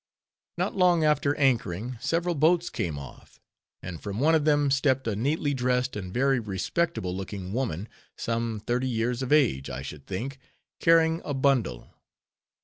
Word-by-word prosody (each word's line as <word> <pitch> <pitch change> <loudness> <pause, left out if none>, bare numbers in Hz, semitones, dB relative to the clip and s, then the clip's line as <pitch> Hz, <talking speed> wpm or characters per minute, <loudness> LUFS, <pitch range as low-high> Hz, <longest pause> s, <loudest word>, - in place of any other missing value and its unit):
Not - - -1
long 180 -3 +4
after 150 -1 +2
anchoring, 120 -3 0
several 170 +6 0
boats 165 +3 +2
came 80 -4 -3
off; 70 -3 -12 0.4
and 90 -3 -7
from 100 +1 -4
one 155 +4 +4
of 155 -2 +3
them 145 -2 +3
stept 135 -2 +2
a 110 - 0
neatly 145 +6 0
dressed 125 0 0
and 95 -3 -5
very 135 +3 +2
respectable 105 - -2
looking 95 0 -6
woman, 110 -6 -2 0.3
some 115 -2 -2
thirty 125 +2 0
years 120 +1 -1
of 130 - -3
age, 130 - +3
I 65 - -5
should 70 0 -9
think, 125 +8 -4 0.4
carrying 165 0 +4
a 145 - -3
bundle. 130 - 0
125 Hz, 155 wpm, -27 LUFS, 100-145 Hz, 0.4 s, long